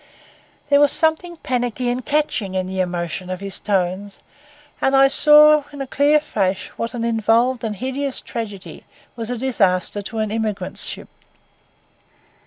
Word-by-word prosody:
There 285 0 +5
was 290 -1 +4
something 330 +2 0
panicky 245 -3 -2
and 245 +1 -1
catching 280 -10 -1
in 185 0 -1
the 190 0 -5
emotion 180 0 -3
of 185 -1 -4
his 195 -1 -5
tones; 195 0 -2 0.6
and 270 - +2
I 270 0 +6
saw 300 +2 +6
in 285 - -10
a 275 - -3
clear 290 +3 +3
flash 195 -10 -2
what 230 +1 -5
an 235 - -3
involved 230 +2 +1
and 215 -2 -3
hideous 265 +4 -3
tragedy 210 -4 -7 0.3
was 230 -1 -6
a 245 - -3
disaster 205 -6 0
to 225 +3 -7
an 215 -1 -1
emigrant 220 -2 -3
ship. - - -1
230 Hz, 155 wpm, -20 LUFS, 195-270 Hz, 0.6 s, I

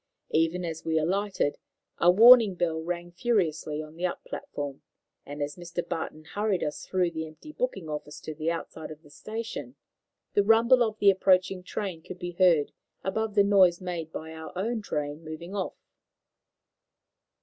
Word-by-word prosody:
Even 165 +3 +1
as 160 -1 -5
we 160 0 0
alighted 190 -1 0 0.4
a 175 - +5
warning 225 +1 +8
bell 165 -2 -1
rang 175 +1 -4
furiously 170 -7 0
on 155 +1 -12
the 175 - -7
up - - -6
platform, 145 -1 -6 0.5
and 145 +1 -4
as 145 +3 -5
Mr. 175 0 -5
Barton 155 -1 -4
hurried 205 +2 -1
us 150 -1 -4
through 180 -2 +1
the 160 -1 -4
empty 155 - -12
booking 485 - -3
office 150 0 -6
to 155 - -6
the 155 +1 -2
outside 165 -1 -5
of 155 +1 -11
the 145 - -18
station, 225 - -6 0.6
the 205 - +4
rumble 230 +4 +5
of 220 -2 +1
the 200 -2 +6
approaching 185 0 +2
train 180 -2 -4
could 175 - -9
be 175 -1 -5
heard 170 -4 +3 0.3
above 215 +2 -2
the 200 - +6
noise 190 -4 +5
made 175 -3 -5
by 160 0 -7
our 160 0 -8
own 220 +4 -1
train 150 -4 -4
moving 160 +4 -8
off. 195 -2 -3
175 Hz, 170 wpm, -28 LUFS, 160-200 Hz, 0.6 s, warning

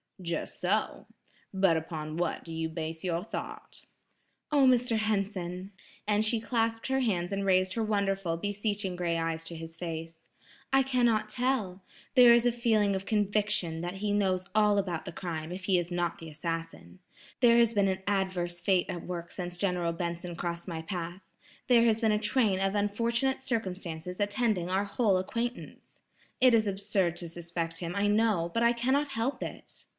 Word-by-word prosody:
"Just 170 -3 -4
so. 200 +4 0 0.4
But 190 -4 +3
upon 155 -1 -5
what 170 -1 -1
do 165 - -8
you 160 0 -2
base 160 0 -5
your 175 -1 -1
thought?" - - -7 0.7
"Oh, 280 -3 +5
Mr. 245 -2 +3
Henson," 195 -3 -2 0.4
and 210 0 +3
she 220 +1 +2
clasped 225 0 -1
her 265 0 +1
hands 195 -7 0
and 195 0 -1
raised 185 -1 +3
her 225 - -1
wonderful, 195 -5 0
beseeching 205 0 -2
gray 170 -1 -1
eyes 165 0 -2
to 170 - -7
his 165 0 -8
face, 165 -1 -6 0.5
"I 270 0 +5
can 255 -2 +2
not 215 -2 +1
tell. 215 -6 -1 0.3
There 245 -3 +8
is 235 0 +4
a 245 - +4
feeling 220 -4 +2
of 190 0 -4
conviction 205 -5 0
that 175 +2 -4
he 205 +1 -2
knows 190 -3 +1
all 210 -1 +4
about 180 -5 -1
the - - -5
crime 165 -2 -5
if 185 +1 -6
he 190 -2 +3
is 175 0 -4
not 175 -1 -1
the 165 - -8
assassin. 165 +3 -5 0.4
There 235 -2 +6
has 235 -1 +4
been 200 -2 +3
an 190 0 -1
adverse 185 -3 -1
fate 185 -1 +2
at 175 -2 -5
work 170 -1 -5
since 175 -1 -5
General 180 -3 0
Benson 170 0 -4
crossed 170 +1 -4
my 165 -2 -4
path. 175 +1 -5 0.5
There 240 -2 +6
has 225 -1 +3
been 220 -2 +2
a 210 - +2
train 210 -3 +2
of 195 +1 0
unfortunate 235 +6 +1
circumstances 180 -7 -4
attending 205 -3 0
our 190 +2 +1
whole 200 -1 +2
acquaintance. 235 +6 -5 0.4
It 255 -2 +6
is 220 -2 +4
absurd 195 -3 0
to 170 - -6
suspect 170 0 -4
him 175 +1 -4
I 200 0 +1
know, 205 -5 +2
but 230 - +1
I 235 0 +5
cannot 265 +5 +1
help 265 +1 -2
it." - - -8
195 Hz, 180 wpm, -29 LUFS, 175-220 Hz, 0.7 s, There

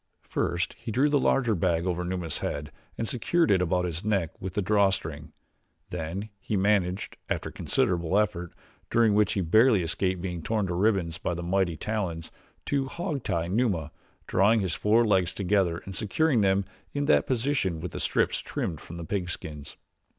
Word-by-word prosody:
First 85 +3 -1
he - - -7
drew 135 +7 +3
the 145 -1 +3
larger 125 -4 +2
bag 85 -2 +1
over 90 -1 -1
Numa's 90 -3 -2
head 75 +1 -4 0.3
and 115 - -2
secured 160 - +1
it 95 -2 +4
about 90 0 +1
his 85 +1 -3
neck 100 -6 0
with 95 -1 -5
the 105 - +1
draw 100 0 +4
string, 95 - -5 0.6
then 90 +5 -4
he 105 +1 -2
managed, 95 -2 +1
after - - -2
considerable 85 +1 0
effort, 95 -5 0 0.4
during 115 -2 +4
which 105 0 +3
he 100 - 0
barely 110 +4 +4
escaped 90 +2 -1
being 90 -2 -4
torn 105 +4 0
to 90 - -2
ribbons 90 -3 +1
by 85 - -2
the 85 - -5
mighty 90 -2 +1
talons, 90 -6 -3 0.3
to 140 -2 0
hog 160 -1 -3
tie 85 -6 -1
Numa 90 -6 0 0.3
drawing 105 +4 +3
his 95 -4 -1
four 115 +3 +3
legs 95 -4 +2
together 95 -3 +1
and 95 - -7
securing 120 +4 +2
them 95 0 +2 0.3
in 145 0 0
that 75 - +3
position 120 - 0
with 85 0 -5
the - - -5
strips - - +1
trimmed 80 -4 -4
from 85 - -9
the 85 - -6
pigskins. 80 -6 -5
95 Hz, 180 wpm, -27 LUFS, 85-110 Hz, 0.6 s, it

